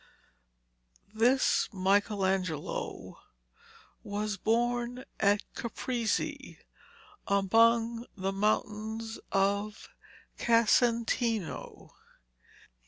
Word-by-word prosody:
This 245 +4 +3
Michelangelo 190 -4 -1 0.8
was 205 0 -3
born 240 +3 -1
at 205 0 +3
Caprese 235 -1 -3 0.7
among 230 +4 +3
the 190 0 -2
mountains 215 +2 -1
of 200 +2 0 0.5
Casentino. 230 -2 +1
220 Hz, 50 wpm, -30 LUFS, 200-235 Hz, 0.8 s, This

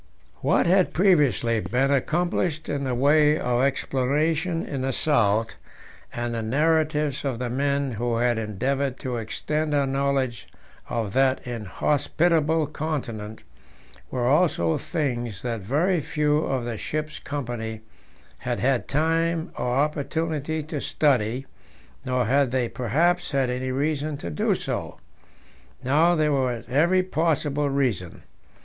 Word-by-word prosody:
What - - +3
had 185 +1 +3
previously 145 - +3
been 130 +5 0
accomplished 160 +2 0
in 140 -1 -2
the 130 -2 -1
way 150 +3 +4
of 125 -3 0
exploration 150 +5 0
in 135 -2 -4
the 135 +1 0
South, 115 -6 +2 0.6
and 120 0 -3
the 115 - -2
narratives 150 +3 +1
of 135 -4 -2
the 120 0 -3
men 140 +1 0
who 115 +1 -1
had 120 -1 +1
endeavoured 130 +6 -1
to 125 -2 -3
extend 150 +7 -2
our 140 -1 +2
knowledge 135 -3 -1 0.4
of 110 -4 -2
that 135 0 +2
inhospitable 150 - +1
continent, 125 -9 -5 0.7
were 125 -2 -2
also 135 - +2
things 120 - -3
that 115 -3 -3
very 155 - +1
few 150 +1 +1
of 130 -3 -1
the 120 -2 -4
ship's 155 +6 -4
company 120 -6 -5 0.6
had - - -3
had 130 -1 +1
time 165 +3 0
or - - -3
opportunity 155 +2 -1
to 150 -1 -5
study, 130 -3 +1 0.6
nor 125 -2 0
had 135 +3 +3
they 125 -1 0
perhaps 165 +11 +1
had 135 -3 +1
any 130 +1 -3
reason 145 +2 -1
to 85 - -6
do 75 - +1
so. - - -4 0.9
Now 155 +7 +4
there 155 -2 +2
was 125 -5 0
every 170 +8 +3
possible 150 -4 0
reason. 125 -11 -1
140 Hz, 130 wpm, -25 LUFS, 120-155 Hz, 0.9 s, way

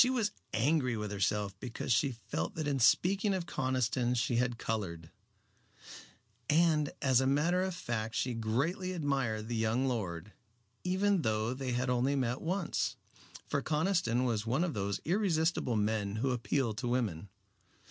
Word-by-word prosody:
She 250 - +5
was 240 -5 +1 0.2
angry 130 0 +1
with 105 -1 -4
herself 100 0 0
because 120 +1 -2
she 135 +4 +2
felt 110 -3 -4
that 155 -2 -2
in 140 -2 0
speaking 195 - +3
of 180 -2 -3
Conniston 130 -4 0
she 120 0 +1
had 125 -1 +1
colored. 90 -9 -4 1.4
And 155 -2 +3
as 130 -2 +4
a 130 - +1
matter 165 +7 +2
of 185 -1 -1
fact 115 -7 -3
she 125 - 0
greatly 140 - -1
admired 135 -9 -1
the 120 - -2
young 115 +4 +1
lord, 100 -6 -3 0.5
even 190 +1 +2
though 110 -1 0
they 130 -1 -3
had 125 +1 0
only 125 +3 +2
met 125 -1 -1
once, 180 +1 -1 0.5
for 140 - -1
Conniston 155 -6 +1
was 115 -4 0
one 125 +9 +1
of 180 - -1
those 100 -2 -2
irresistible 165 - +1
men 105 -1 0
who 130 +4 0
appeal 125 0 0
to 120 +4 -4
women. 105 -8 -1
125 Hz, 155 wpm, -32 LUFS, 110-155 Hz, 1.4 s, She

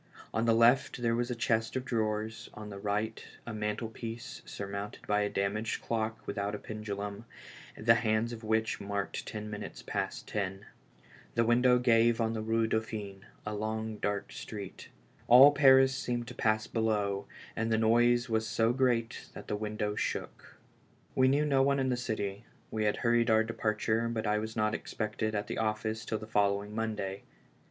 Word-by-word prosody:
On 110 - +1
the 115 -1 +4
left 120 +2 +4
there 115 -1 +2
was 120 +1 0
a 125 - -2
chest 115 -1 0
of 130 0 -2
drawers, 110 -1 -2
on 105 -1 -8
the 100 - -7
right 105 +2 -2 0.2
a 115 - -5
mantlepiece 110 +2 -4
surmounted 100 +1 -6
by 105 0 +2
a 105 - 0
damaged 100 +3 -1
clock 110 -1 -2
without 100 +1 -2
a - - -4
pendulum, 105 0 -5 0.5
the 115 +2 +5
hands 115 0 +1
of 115 -1 -8
which 110 0 0
marked 100 0 -3
ten 105 -1 -5
minutes 105 -1 -7
past - - -3
ten. 100 -1 -3 0.7
The 115 - +4
window 125 +2 +4
gave 120 -1 +4
on 115 -1 +1
the 110 - -2
Bue 115 +1 +1
Dauphine, 110 -3 -3 0.2
a 105 - -3
long, 110 +1 -3
dark 105 -1 -2
street. 100 -3 -8 0.4
All 130 +4 +10
Paris 135 -2 +6
seemed 120 -2 -2
to - - -7
pass 110 -1 +1
below, 105 -3 0 0.3
and 115 0 -1
the 110 - +3
noise 120 +2 +4
was 110 -1 0
so 115 +3 +2
great 120 -3 0
that - - -10
the - - -1
window 105 0 -2
shook. - - -4 0.6
We 130 0 +4
knew 145 +3 +3
no 135 -2 +3
one 140 +1 +3
in 130 -1 +1
the 125 - +2
city; 110 -3 -3 0.3
we 110 -1 -1
had 105 - +1
hurried 120 0 +2
our 110 0 +5
departure, 110 0 0
but 115 -1 -2
I 105 0 +2
was 110 +1 -5
not 110 -1 +1
expected 110 0 -3
at 105 - -1
the - - -4
office 110 +1 -1
till 110 - -1
the 110 - -8
following 105 -1 +1
Monday. 105 -3 -3
110 Hz, 180 wpm, -31 LUFS, 105-115 Hz, 0.7 s, All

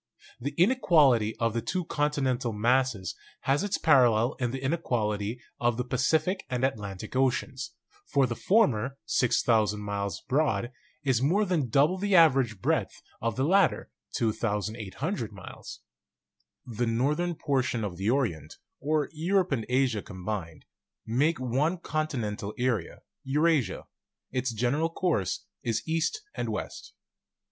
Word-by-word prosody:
The 140 +3 -4
inequality 155 - +4
of 115 -1 0
the 115 - -1
two 180 - -2
continental 135 -6 0
masses 115 -3 +1 0.3
has 140 +6 +1
its 205 - 0
paral 125 -7 +5
lel 115 +5 +1
in 120 -2 0
the 130 - -3
inequality 120 -7 -1 0.2
of 120 -1 +1
the 125 - 0
Pacific 155 +9 +1
and 125 0 -2
Atlantic 105 -6 -4
oceans; 130 0 0 0.3
for 140 - +3
the 120 -2 -3
former 135 - +2
(6,000 110 -4 +2
miles 100 -1 -3
broad) 125 -5 0 0.3
is 130 -4 +2
more 185 +10 +3
than 165 -9 0
double 150 +10 +3
the 200 0 +1
average 135 - +4
breadth - - 0 0.2
of 115 -1 -1
the 130 - 0
latter 190 +6 +2 0.2
(2,800 110 - -2
miles). 100 -2 -10 0.8
The 120 0 -2
northern 150 +10 0
portion 130 -6 0
of 95 -4 -4
the 95 +4 -1
Orient, 115 - -1 0.2
or 150 0 0
Europe 180 +3 +1
and 115 -6 -1
Asia 125 -4 +2
com 95 -3 -10
bined, 90 -7 -4 0.4
makes 140 +8 +1
one 135 +8 0
continental 120 - -3
area, 120 -7 -1 0.2
Eurasia; 145 - +1 0.5
its 130 -1 -1
general 125 +8 0
course 165 - -1 0.2
is 115 +4 -2
east 165 - -1
and - - -3
west. - - -6
130 Hz, 135 wpm, -28 LUFS, 110-150 Hz, 0.8 s, paral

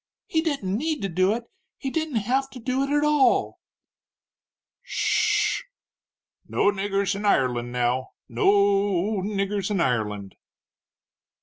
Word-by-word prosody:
"He 320 - 0
didn't 275 - -1
need 300 +1 -2
to 195 - -1
do 185 +3 +2
it 240 - -5 0.3
he 270 - -4
didn't 315 -3 -2
have 255 +6 0
to 255 - -10
do 255 +2 -1
it, 275 - -1
at 290 +1 +2
all!" 300 -2 +2 1.2
"Sh 435 -3 +1
h - - -12
h! - - -31 0.8
No 205 - +3
niggers 200 0 -1
in 200 +1 -5
Ireland, 125 -10 +1
now 125 +1 -1
no 120 +8 +1
o 200 0 +2
o - - -1
niggers 200 0 -2
in 205 -3 0
Ireland!" 105 - -1
200 Hz, 145 wpm, -25 LUFS, 185-270 Hz, 1.2 s, No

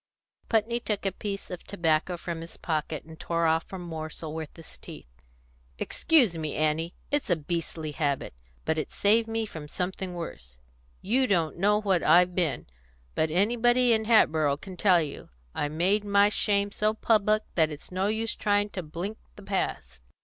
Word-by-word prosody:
Putney 230 +1 +1
took 210 -4 -3
a 195 - +2
piece 200 +1 -5
of 180 - -6
tobacco 170 -2 0
from 170 -1 -5
his 165 - -9
pocket, 155 -2 -2
and 160 0 -13
tore 170 0 0
off 160 0 +1
a 190 - -5
morsel 160 -2 -6
with 160 -2 -5
his 165 - -11
teeth. - - -13 0.6
"Excuse 250 - +3
me, 155 -2 -3
Annie! 155 +2 0 0.2
It's 290 -5 0
a 175 - +4
beastly 160 0 -4
habit. 145 - -2 0.3
But 160 0 +1
it's - - -5
saved 225 +3 +3
me 225 0 -1
from 155 -7 -8
something 180 +2 -4
worse. 65 - -7 0.5
You 255 +6 +2
don't 170 -5 0
know 210 +2 +3
what 195 -5 +1
I've 180 +1 +5
been; 175 -6 0 0.5
but 160 - +1
anybody 240 +7 +3
in 220 -1 +1
Hatboro' 155 -10 +4
can 185 +4 -10
tell 180 -3 +4
you. 145 - -8 0.2
I 145 - -1
made 185 +7 +1
my 200 0 +4
shame 205 -1 +1
so 215 +1 0
public 215 -1 +2
that 160 -3 +3
it's 150 +2 -9
no 185 +2 0
use 220 +1 0
trying 205 0 +1
to 185 - -4
blink 175 +7 -6 0.2
the 205 - -12
past. 65 - -3
180 Hz, 175 wpm, -27 LUFS, 160-210 Hz, 0.6 s, I've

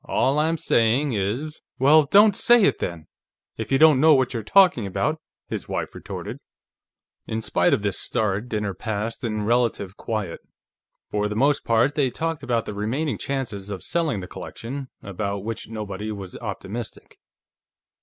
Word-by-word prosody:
All 140 +3 +1
I'm 160 +2 +1
saying 125 +1 +2
is 115 +10 -2
" - - -68
"Well, 145 +3 +6
don't 205 +6 +6
say 240 +1 +5
it, - - +3
then, 80 -3 -4 0.5
if 110 - -6
you 135 - +4
don't 155 -2 +6
know 155 +1 +7
what 130 -1 +1
you're 115 - -2
talking 175 - +4
about," 100 - -1 0.3
his - - -5
wife - - -3
retorted. - - -7 0.9
In 110 0 -3
spite 90 -4 +2
of 105 - +1
this 100 -2 0
start, 110 0 -1
dinner 105 -3 -2
passed 110 +4 -4
in 110 -3 -2
relative 115 -4 0
quiet. 105 -7 -3 0.7
For 105 0 0
the 105 - -4
most 140 +5 +2
part, 115 +5 +2
they 145 -3 +1
talked 165 +3 -3
about 120 -4 -1
the - - -5
remaining 125 +9 -2
chances 115 -8 -4
of 100 -3 -6
selling 155 - -1
the 90 - -7
collection, 135 +9 -7 0.2
about 100 0 -4
which 115 0 -5
nobody 105 -1 -5
was 100 -3 -7
optimistic. 105 +1 -7
115 Hz, 165 wpm, -24 LUFS, 105-140 Hz, 0.9 s, know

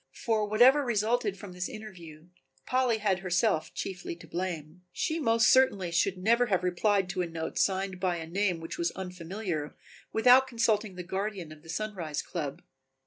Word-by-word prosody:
For 220 -4 0
whatever 250 +7 +6
resulted 220 -3 0
from 200 -2 -9
this 180 0 -4
interview 175 -7 -11 0.4
Polly 255 -3 +2
had 200 -3 +1
herself 180 -1 +1
chiefly 180 -2 -5
to 170 - -14
blame. 170 -1 -5
She 320 - -1
most 230 -5 +4
certainly 205 -9 +3
should 185 +3 +1
never 235 +6 +3
have 190 -4 +1
replied 195 +2 +2
to 185 -1 -1
a 175 - -1
note 165 -1 -4
signed 190 -1 0
by 180 -1 0
a 165 -1 -5
name 180 +1 0
which 165 - -7
was 170 0 +1
unfamiliar 180 -3 -5 0.4
without 250 +3 +6
consulting 220 -5 0
the 180 - -6
guardian 190 -2 -4
of 155 -1 -12
the 165 - -16
Sunrise 175 -5 -3
club. 150 -6 -5
190 Hz, 170 wpm, -29 LUFS, 175-220 Hz, 0.4 s, whatever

